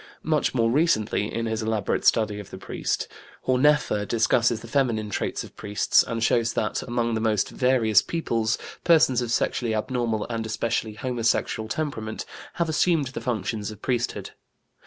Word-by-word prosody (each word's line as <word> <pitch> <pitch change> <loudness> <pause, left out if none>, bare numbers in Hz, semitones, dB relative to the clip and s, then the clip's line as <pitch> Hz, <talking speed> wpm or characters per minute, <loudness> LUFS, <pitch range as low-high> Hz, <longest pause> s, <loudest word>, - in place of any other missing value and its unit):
Much 155 -3 +1
more 115 -2 +2
recently, 110 -8 +1
in 115 - -2
his 110 0 -2
elaborate 110 -3 -1
study 105 -2 +2
of 100 -1 -9
the - - -8
priest, - - -3 0.4
Horneffer 130 -4 +3
discusses 115 +1 +2
the - - -10
feminine 115 -4 0
traits - - -2
of - - -13
priests 105 0 +2
and 115 -1 -3
shows 115 -1 +2
that, 105 - -1
among 120 -1 -1
the 110 - -1
most 110 -3 +1
various 125 -5 +3
peoples, 115 -9 -1 0.3
persons 155 -7 +4
of 120 -2 -3
sexually 115 -1 0
abnormal 115 -1 -1
and 115 -1 -3
especially 110 0 -2
homosexual 115 -2 -1
temperament 115 -6 -3 0.3
have 170 - 0
assumed 160 -3 +2
the 130 - -6
functions 110 -3 -2
of 105 -1 -11
priesthood. 125 -2 -2
115 Hz, 155 wpm, -25 LUFS, 110-125 Hz, 0.4 s, persons